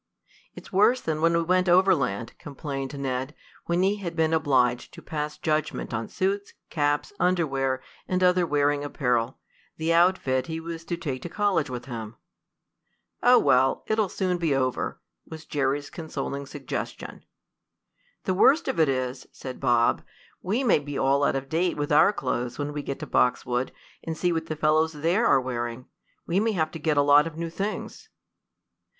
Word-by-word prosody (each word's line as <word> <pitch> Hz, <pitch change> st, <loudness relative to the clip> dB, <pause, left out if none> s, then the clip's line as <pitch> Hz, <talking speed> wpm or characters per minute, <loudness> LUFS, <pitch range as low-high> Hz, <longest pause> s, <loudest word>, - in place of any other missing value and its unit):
"It's -, -, -12 dB
worse 215 Hz, +6 st, +4 dB
than 155 Hz, -6 st, -3 dB
when 165 Hz, +1 st, +3 dB
we 170 Hz, -, +1 dB
went 185 Hz, +2 st, +2 dB
overland," 145 Hz, -, +2 dB
complained 140 Hz, -1 st, -6 dB
Ned, 130 Hz, +1 st, -3 dB, 0.3 s
when 175 Hz, +2 st, +1 dB
he 200 Hz, +2 st, +2 dB
had 175 Hz, -4 st, -5 dB
been 160 Hz, -1 st, +1 dB
obliged 130 Hz, -6 st, +1 dB
to 170 Hz, -, -11 dB
pass 150 Hz, -2 st, -4 dB
judgment 155 Hz, -5 st, -2 dB
on 115 Hz, 0 st, -2 dB
suits, 200 Hz, +2 st, -2 dB, 0.2 s
caps, 145 Hz, +2 st, 0 dB
underwear 135 Hz, -8 st, +1 dB, 0.2 s
and 185 Hz, 0 st, 0 dB
other 180 Hz, -1 st, +4 dB
wearing 145 Hz, -1 st, +1 dB
apparel 125 Hz, -4 st, -1 dB, 0.4 s
the 160 Hz, +1 st, +1 dB
outfit 170 Hz, -7 st, +2 dB
he 160 Hz, 0 st, -4 dB
was 165 Hz, 0 st, -7 dB
to 170 Hz, -, -3 dB
take 140 Hz, -7 st, -4 dB
to 175 Hz, -, -6 dB
college 195 Hz, -7 st, +1 dB
with 125 Hz, -1 st, -6 dB
him. 115 Hz, -3 st, -7 dB, 1.1 s
"Oh, -, -, +6 dB
well, 130 Hz, +1 st, +3 dB
it'll 215 Hz, -2 st, +1 dB
soon 180 Hz, -2 st, -1 dB
be 160 Hz, -5 st, +1 dB
over," 130 Hz, -1 st, -1 dB, 0.3 s
was 160 Hz, 0 st, -9 dB
Jerry's 140 Hz, 0 st, -1 dB
consoling 140 Hz, -3 st, -5 dB
suggestion. 140 Hz, -2 st, -6 dB, 1.0 s
"The 185 Hz, -, 0 dB
worst 280 Hz, -, +4 dB
of -, -, -1 dB
it 155 Hz, -3 st, +4 dB
is," 130 Hz, 0 st, -2 dB
said 130 Hz, -1 st, -8 dB
Bob, 120 Hz, -3 st, +2 dB, 0.4 s
"we 215 Hz, +9 st, -1 dB
may 230 Hz, -10 st, +4 dB
be 145 Hz, -1 st, -6 dB
all 140 Hz, +1 st, +2 dB
out -, -, +2 dB
of 135 Hz, 0 st, -3 dB
date 170 Hz, +4 st, 0 dB
with 145 Hz, 0 st, -2 dB
our 155 Hz, +6 st, +6 dB
clothes 125 Hz, -8 st, -3 dB
when 145 Hz, 0 st, -3 dB
we 145 Hz, -, -3 dB
get 140 Hz, -1 st, -5 dB
to -, -, -3 dB
Boxwood 125 Hz, 0 st, +1 dB, 0.3 s
and 160 Hz, -1 st, -4 dB
see 175 Hz, +1 st, +1 dB
what 160 Hz, 0 st, -2 dB
the 155 Hz, -, -3 dB
fellows 155 Hz, +1 st, +2 dB
there 170 Hz, +9 st, +1 dB
are -, -, +5 dB
wearing. 120 Hz, -1 st, -4 dB, 0.4 s
We 175 Hz, +3 st, +1 dB
may 220 Hz, +1 st, +1 dB
have 160 Hz, -4 st, 0 dB
to 165 Hz, -, -7 dB
get 150 Hz, -1 st, 0 dB
a 145 Hz, -, +5 dB
lot 145 Hz, +2 st, +6 dB
of 160 Hz, -1 st, -9 dB
new 165 Hz, 0 st, -4 dB
things." 210 Hz, -, -5 dB
150 Hz, 175 wpm, -26 LUFS, 135-170 Hz, 1.1 s, Oh